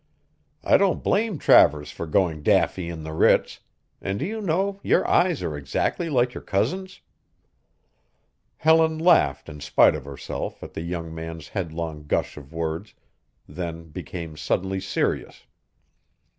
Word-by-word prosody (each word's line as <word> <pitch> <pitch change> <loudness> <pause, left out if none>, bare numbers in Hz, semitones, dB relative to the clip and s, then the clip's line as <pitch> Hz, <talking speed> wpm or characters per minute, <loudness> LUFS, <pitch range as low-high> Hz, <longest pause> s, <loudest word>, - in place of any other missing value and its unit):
"I - - +5
don't 195 -2 +1
blame 215 -4 +1
Travers 75 - +5
for 85 - -6
going 80 -2 +1
daffy 85 +3 +2
in 80 -2 -6
the 80 0 -6
Ritz, - - +3 0.4
and 95 0 -2
do 145 - -2
you 220 +3 -4
know 195 +2 0
your - - +2
eyes 175 -4 +2
are 75 - -3
exactly 70 - -2
like 125 -3 +2
your - - -7
cousin's!" 185 - -2 1.6
Helen 160 0 +4
laughed 160 - +3
in 75 - -9
spite 75 0 +4
of - - -6
herself 70 -2 -6
at - - -9
the - - -5
young 85 -1 -5
man's 80 -1 -7
headlong 80 -5 -5
gush - - -1
of 70 -2 -12
words, 80 +4 -4 0.5
then 85 -2 -6
became 80 +1 -7
suddenly 95 +5 -1
serious. 95 - -2
85 Hz, 145 wpm, -24 LUFS, -, 1.6 s, I